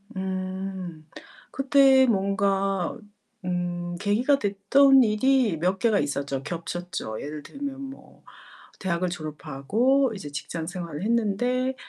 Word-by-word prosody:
음. 185 -3 -5 0.4
그때 270 -1 +5
뭔가 195 -2 0 0.5
음 175 -1 -2
계기가 240 +8 +2
됐던 255 +7 +5
일이 225 -2 +2
몇 180 +4 0
개가 220 -3 +3
있었죠, 140 -1 -2
겹쳤죠. 170 -6 -5
예를 150 0 -6
들면 275 - -6
뭐 270 0 -11 0.6
대학을 180 -1 -1
졸업하고 175 - 0
이제 150 -7 -7
직장 150 +3 -5
생활을 170 -2 -5
했는데 240 +4 +1
195 Hz, 220 characters per minute, -25 LUFS, 170-245 Hz, 0.6 s, 그때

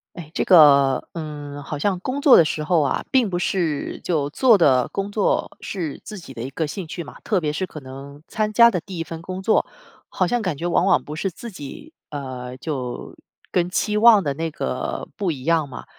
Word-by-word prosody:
诶， 160 -4 -9
这 - - 0
个， 140 -6 +6
嗯， 145 -3 -7
好 145 +1 -5
像 185 +3 0
工 260 +8 -3
作 280 -2 +7
的 165 - +7
时 155 0 -2
候 170 +1 +2
啊， - - -1
并 255 -5 +3
不 175 -2 -2
是 170 -5 -2
就 150 -5 -1
做 240 - +5
的 130 -8 +3
工 200 +1 -4
作 205 -1 0
是 170 -7 -5
自 215 -2 -8
己 165 -7 -11
的 115 - -7
一 130 - -5
个 160 +3 -2
兴 170 +3 -6
趣 170 +1 -6
嘛， - - -12
特 205 -5 +1
别 150 -2 -1
是 185 +5 -2
可 160 - -10
能 140 +2 -11
参 215 0 -2
加 235 +2 +7
的 180 -6 -2
第 185 +1 -9
1 165 - -2
份 165 0 -8
工 185 +2 -6
作， 215 - +2 0.4
好 185 - 0
像 240 +6 0
感 185 -8 -2
觉 170 - -4
往 175 +1 +2
往 - - +3
不 150 - -7
是 190 +5 -2
自 235 +7 -9
己， 185 - -10 0.2
呃， 130 -3 -6
就 130 -4 -5 0.4
跟 175 -1 +1
期 210 +3 0
望 220 -3 +7
的 145 - 0
那 165 +2 -3
个 65 - -4
不 195 -4 -1
一 135 -5 -5
样 165 -2 +2
嘛。 130 - -9
165 Hz, 235 characters per minute, -22 LUFS, 145-195 Hz, 0.4 s, 作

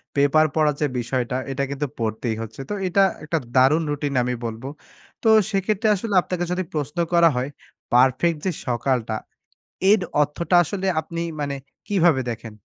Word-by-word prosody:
Paper 145 +2 +4
পড়ার 150 -2 +2
যে 150 - +3
বিষয়টা, 125 +1 -2 0.2
এটা 140 +1 -1
কিন্তু 145 +1 -2
পড়তেই 110 +1 -2
হচ্ছে। 115 +4 -7
তো 210 - -2
এটা 195 +2 +3 0.2
একটা 160 +2 -1 0.2
দারুণ 140 +6 +5
রুটিন 145 -1 -2
আমি 125 0 -1
বলবো। 115 +3 -5 0.6
তো - - +2 0.2
সেক্ষেত্রে 205 +2 0
আসলে 205 +2 -4
আপনাকে 175 -1 -3
যদি 185 +1 0
প্রশ্ন 150 +1 -3 0.2
করা 170 -1 +6
হয়, 130 +3 -1 0.4
পারফেক্ট 130 +6 +4
যে 185 - +1 0.2
সকালটা, 120 -2 0 0.8
এর 210 - +5 0.2
অর্থটা 160 +4 0
আসলে 195 +4 -4
আপনি 165 +2 -6 0.2
মানে 140 -1 -2 0.3
কিভাবে 175 -9 +3
দেখেন? 115 -1 -7
145 Hz, 155 wpm, -23 LUFS, 125-170 Hz, 0.8 s, করা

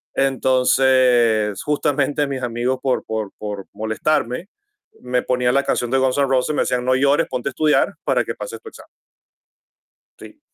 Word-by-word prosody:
Entonces, 125 -5 +2
justamente 145 -1 0
mis 135 -2 -4
amigos 120 +2 -1
por 130 -2 -1
por 110 -3 -4
por 105 -2 -6
molestarme, 115 - -1 0.5
me 125 0 -1
ponían 125 0 +1
la 140 - +3
canción 120 0 -1
de 135 - +2
Guns 130 +1 +1
N' 140 - +3
Roses, 130 +3 0
me - - +2
decían: 125 0 -1
"No 130 0 +3
llores, 140 +2 +2
ponte 125 +1 -3
a - - -8
estudiar 155 +2 +2
para - - +1
que - - -4
pases - - -7
tu 445 - -10
examen". - - -15 1.3
Sí. 305 - -13
130 Hz, 165 wpm, -20 LUFS, 120-140 Hz, 1.3 s, la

